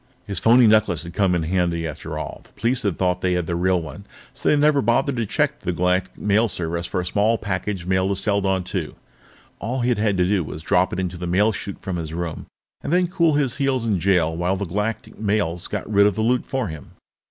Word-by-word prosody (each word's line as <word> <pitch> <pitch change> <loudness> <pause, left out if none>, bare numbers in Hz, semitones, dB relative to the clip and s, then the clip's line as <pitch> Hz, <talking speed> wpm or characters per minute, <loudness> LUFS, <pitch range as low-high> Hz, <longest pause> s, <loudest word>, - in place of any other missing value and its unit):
His 100 -4 -2
phony 120 +2 +6
necklace 105 -7 +3
had 85 0 -8
come 95 -2 +2
in 85 - 0
handy 85 -1 0
after 75 - -6
all; - - -6
the - - -24
police 125 +2 0
had 100 -7 -1
thought 90 -1 0
they 90 -1 +1
had 90 -1 0
the 85 - -2
real 90 +1 +2
one, 85 +5 -9 0.3
so 135 - -1
they - - +5
had 150 - +3
never 145 -1 +4
bothered 125 +4 +1
to 115 -2 -1
check - - 0
the 90 - -2
Galactic 90 +2 0
Mail 105 +3 +2
Service 85 -3 -3
for - - -2
a - - -6
small 105 +5 +2
package 100 -2 -3
mailed 95 +1 +1
to 100 - 0
Seladon 95 -2 +1
II. - - -3 0.6
All 125 +3 -2
he'd 120 -2 +1
had 105 -2 +1
to 90 - +3
do 95 -1 +1
was 75 +1 -7
drop 90 +2 +2
it 90 - -3
into 90 -1 -3
the 90 - -4
mail 100 +5 +3
chute 100 -2 -6
from 95 -2 -3
his 80 -1 -5
room 85 -2 -4 0.3
and 140 - -4
then 180 0 +2
cool 170 -4 +2
his 140 -5 0
heels 135 -4 0
in 105 -5 +1
jail 85 -3 +2
while 90 +3 0
the 100 - -3
Galactic 105 +5 -3
Mails 100 -5 0
got 105 - -4
rid 100 -1 +4
of 105 - 0
the 110 - -1
loot 125 +2 +1
for 130 -4 -1
him. 80 -5 -9
100 Hz, 245 wpm, -22 LUFS, 90-110 Hz, 0.6 s, phony